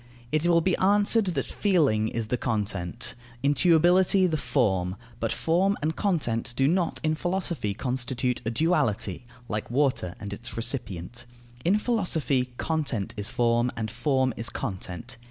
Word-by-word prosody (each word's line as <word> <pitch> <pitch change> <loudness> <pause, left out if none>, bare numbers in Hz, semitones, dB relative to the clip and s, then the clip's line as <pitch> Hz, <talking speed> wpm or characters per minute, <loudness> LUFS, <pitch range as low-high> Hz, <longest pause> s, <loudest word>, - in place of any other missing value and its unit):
It 155 +2 +1
will 170 -1 +5
be 185 +2 +2
answered 205 +3 +4
that 180 -3 -1
feeling 145 - +2
is 115 -1 -3
the - - +2
content, 105 -4 -1 0.3
intuibility 175 +5 +4
the 160 - 0
form; 105 -10 0 0.2
but 115 -1 -1
form 190 +5 +1
and 155 +2 -1
content 120 - -1
do 135 - +4
not 175 +1 +1
in 155 0 +2
philosophy 170 - -2
constitute 125 0 -1
a 115 - -1
duality, 115 - 0 0.2
like 105 -2 -3
water 125 -9 0
and 100 -1 -6
its 120 +4 -7
recipient; 115 -2 -4 0.4
in 190 +5 +3
philosophy 160 - 0
content 145 -11 -1
is 105 0 -3
form, 120 0 +2
and 110 -1 -3
form 130 -4 +1
is 115 +1 -1
content. 100 +6 -5
130 Hz, 145 wpm, -27 LUFS, 115-170 Hz, 0.4 s, will